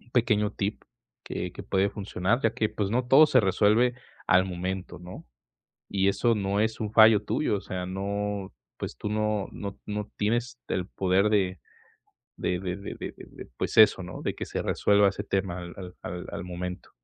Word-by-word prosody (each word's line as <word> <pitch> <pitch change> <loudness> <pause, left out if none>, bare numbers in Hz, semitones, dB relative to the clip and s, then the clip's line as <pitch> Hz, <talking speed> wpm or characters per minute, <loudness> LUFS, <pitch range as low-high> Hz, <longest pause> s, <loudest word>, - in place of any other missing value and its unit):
un 120 - -24
pequeño 110 -3 +2
tip, 100 +1 -3 0.4
que - - -4
que - - -8
puede 95 +1 +1
funcionar, 100 +2 -1
ya 115 0 +2
que, 110 - +1
pues, 100 -2 -2
no 125 +3 0
todo 135 +5 +8
se 130 -4 +5
resuelve 105 +5 +3 0.3
al 95 0 +5
momento, 90 +1 -4
¿no? 90 +1 -10 0.6
Y 100 -1 +2
eso 100 +4 +2
no 100 -1 -1
es 110 +1 0
un 105 -2 -2
fallo 110 -1 +7
tuyo, 105 +1 0
o - - -8
sea, 95 -2 -5
no, 100 +1 -3 0.3
pues, - - -5
tú 105 - -3
no 105 -2 0
no 100 -1 -6
no 105 0 -4
tienes 120 +3 -1
el 90 -2 -1
poder 95 +1 +2
de 95 -5 +1 0.8
de 90 -1 -1
de 90 -1 -3
de 100 0 -7
de, - - -9
pues, - - -2
eso, 110 -3 +7
¿no?, 90 -1 -8
de - - -2
que - - -5
se - - -3
resuelva 100 0 +3
ese 100 +1 -4
tema 95 -3 -1
al 90 0 -8
al 90 -2 -8
al 90 +1 -6
al 85 - -5
momento. 90 +1 -6
100 Hz, 190 wpm, -27 LUFS, 95-110 Hz, 0.8 s, todo